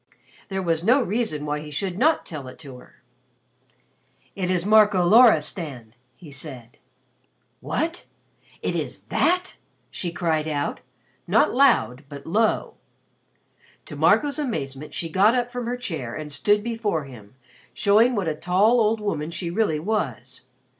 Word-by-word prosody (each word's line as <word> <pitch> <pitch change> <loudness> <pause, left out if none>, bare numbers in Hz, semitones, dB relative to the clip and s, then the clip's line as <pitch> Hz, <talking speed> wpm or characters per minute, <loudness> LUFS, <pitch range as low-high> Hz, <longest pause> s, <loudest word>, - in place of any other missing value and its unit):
There 190 -1 -3
was 165 -1 0
no 245 +8 +4
reason 205 -9 -2
why 150 0 -2
he 150 0 -9
should 185 +4 -4
not 310 +5 +2
tell 145 -5 -7
it 130 - -11
to 135 -5 -11
her. 125 - -20 1.3
"It 185 -2 -2
is 180 -1 0
Marco 210 -4 +5
Loristan," 160 - +3 0.2
he 155 -5 -14
said. 130 -4 -8 0.8
"What! 330 +2 -3 0.6
It - - -1
is - - -4
that!" 360 +2 +1 0.3
she 175 - -4
cried 160 -2 -1
out, 145 -2 -2 0.5
not 210 +6 +3
loud 230 - +3
but 140 -1 -10
low. 215 +6 0 1.1
To - - -8
Marco's 290 0 +2
amazement 150 - -4
she 165 - -2
got 200 +8 +3
up 245 -1 -1
from 245 -1 -4
her 245 +1 -2
chair 160 - -5
and 155 -1 -6
stood 205 +7 +2
before 220 -8 -2
him, 120 -4 -14 0.4
showing 225 +5 +3
what 195 -5 -1
a 160 - 0
tall 190 +9 +2
old 220 +1 +2
woman 185 -7 -3
she 170 0 -4
really 175 -6 0
was. 150 - -3
180 Hz, 145 wpm, -23 LUFS, 150-225 Hz, 1.3 s, Marco